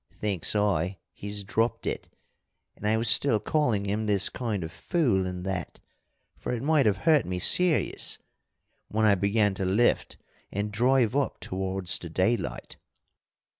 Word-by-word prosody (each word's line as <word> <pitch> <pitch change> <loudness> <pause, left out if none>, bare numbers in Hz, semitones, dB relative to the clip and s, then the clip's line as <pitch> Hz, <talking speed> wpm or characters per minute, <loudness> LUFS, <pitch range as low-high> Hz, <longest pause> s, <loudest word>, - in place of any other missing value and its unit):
Thinks 100 -3 -1
I, 95 -3 0 0.2
he's 100 0 -6
dropped 115 +4 -1
it, - - -4 0.7
and 105 - -5
I 110 +1 +2
was 115 +1 -1
still 110 +2 +6
calling 120 -8 0
him 105 +2 -2
this 100 -2 +2
kind 110 -7 -3
of 80 - -6
fool 120 - 0
and 90 0 -6
that 95 -5 -4 0.6
for - - -4
it 120 -1 -3
might 150 -4 +3
have 105 -2 +2
hurt 150 +7 +3
me 90 0 -4
serious 175 - +2 0.7
when 110 +1 0
I 105 - +5
began 100 +1 +1
to 95 - -4
lift 100 +6 +1 0.3
and 105 +1 -3
drive 125 +1 +2
up 140 -1 -1
towards 95 -1 -2
the 85 - -8
daylight. 95 +8 -2
105 Hz, 155 wpm, -27 LUFS, 95-120 Hz, 0.7 s, still